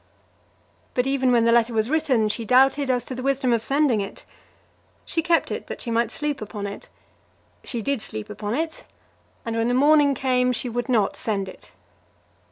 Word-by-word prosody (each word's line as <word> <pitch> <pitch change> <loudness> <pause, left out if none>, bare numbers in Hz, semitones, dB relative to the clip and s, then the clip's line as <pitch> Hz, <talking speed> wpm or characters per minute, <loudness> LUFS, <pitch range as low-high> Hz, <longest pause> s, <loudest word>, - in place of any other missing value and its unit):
But 250 - +1
even 270 -1 +1
when 235 -2 +4
the 230 - +4
letter 235 0 +3
was 220 0 +1
written 275 -7 +2
she 220 +2 -2
doubted 265 +4 +3
as 250 -2 +1
to - - -6
the 255 - -5
wisdom 265 -2 +1
of 230 -1 0
sending 275 -6 +2
it. 195 - -8 0.8
She 330 - -1
kept 335 0 +1
it - - -5
that - - -6
she 235 - -4
might 230 0 +1
sleep 295 +2 -3
upon 210 -1 -6
it. 200 0 -8 0.7
She 235 -4 -4
did 280 -2 -1
sleep 110 - -6
upon 210 +2 -4
it, 320 +2 -3 0.6
and 230 -1 -3
when 230 0 +1
the 245 - +1
morning 290 +1 +5
came 250 -1 +1
she 245 - -2
would 245 +2 -3
not 220 -6 +2
send 200 -3 -2
it. 185 - -12
250 Hz, 190 wpm, -23 LUFS, 225-275 Hz, 0.8 s, morning